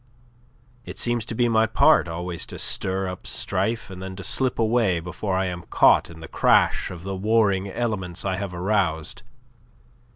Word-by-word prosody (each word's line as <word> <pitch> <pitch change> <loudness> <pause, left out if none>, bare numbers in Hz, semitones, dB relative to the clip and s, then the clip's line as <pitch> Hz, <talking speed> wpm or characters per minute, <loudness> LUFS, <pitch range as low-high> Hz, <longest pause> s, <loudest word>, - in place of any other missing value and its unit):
It - - -9
seems 120 -2 0
to 115 - -4
be 120 +1 +2
my 110 -1 +3
part 85 - +4
always 85 +1 -5
to - - -8
stir 95 0 0
up 90 0 -7
strife 110 -3 -2
and 95 0 -9
then 95 0 -6
to 95 - -8
slip 130 +4 +1
away 110 -6 +2
before 90 +3 -4
I 95 - 0
am 90 -1 -4
caught - - +4
in 80 -1 -12
the 80 - -8
crash - - +2
of 90 -1 -9
the 95 0 -4
warring 100 -1 +1
elements 95 -6 -3
I 95 -1 -1
have 100 -1 -4
aroused. 85 -4 -1
95 Hz, 175 wpm, -24 LUFS, 90-110 Hz, -, part